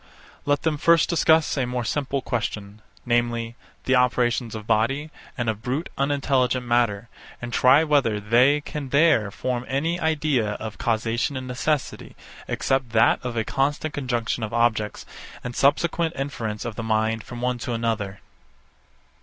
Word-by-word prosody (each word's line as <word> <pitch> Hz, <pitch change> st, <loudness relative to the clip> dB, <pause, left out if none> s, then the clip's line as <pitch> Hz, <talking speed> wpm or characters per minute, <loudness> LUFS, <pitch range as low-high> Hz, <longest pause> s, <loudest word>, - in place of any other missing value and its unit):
Let 145 Hz, 0 st, +1 dB
them 155 Hz, -3 st, 0 dB
first 165 Hz, 0 st, +4 dB
discuss 160 Hz, -2 st, +3 dB
a 130 Hz, -2 st, 0 dB
more 125 Hz, -1 st, -3 dB
simple 140 Hz, +2 st, -2 dB
question, 105 Hz, -3 st, -4 dB, 0.2 s
namely, 120 Hz, -1 st, 0 dB, 0.3 s
the 130 Hz, -, +1 dB
operations 125 Hz, -2 st, +1 dB
of 110 Hz, -1 st, -7 dB
body 135 Hz, +9 st, 0 dB, 0.3 s
and 120 Hz, -2 st, -2 dB
of 110 Hz, -1 st, -2 dB
brute 135 Hz, +7 st, -3 dB
unintelligent 135 Hz, -3 st, +1 dB
matter; 120 Hz, -3 st, +1 dB, 0.3 s
and 120 Hz, 0 st, -7 dB
try 130 Hz, +5 st, +5 dB
whether 140 Hz, -9 st, +2 dB
they 125 Hz, +8 st, +3 dB
can 145 Hz, -2 st, -6 dB
there 140 Hz, -7 st, +4 dB
form 125 Hz, +4 st, -3 dB
any 160 Hz, +6 st, -1 dB
idea 145 Hz, -9 st, 0 dB
of 110 Hz, 0 st, -7 dB
causation 115 Hz, +4 st, -1 dB
and 130 Hz, -, -5 dB
necessity, 130 Hz, +3 st, -2 dB, 0.3 s
except 135 Hz, -3 st, -1 dB
that 115 Hz, +2 st, +4 dB
of 125 Hz, -2 st, -4 dB
a 110 Hz, -, +1 dB
constant 145 Hz, +4 st, -1 dB
conjunction 120 Hz, -4 st, -2 dB
of 110 Hz, 0 st, -3 dB
objects, 110 Hz, -3 st, 0 dB, 0.4 s
and 125 Hz, -1 st, -6 dB
subsequent 165 Hz, +4 st, +2 dB
inference 115 Hz, -6 st, -4 dB
of 115 Hz, -3 st, -5 dB
the -, -, -2 dB
mind 110 Hz, 0 st, 0 dB
from 120 Hz, -, -9 dB
one 125 Hz, 0 st, -1 dB
to 120 Hz, -, -4 dB
another. 110 Hz, -4 st, -2 dB
125 Hz, 155 wpm, -24 LUFS, 115-140 Hz, 0.4 s, try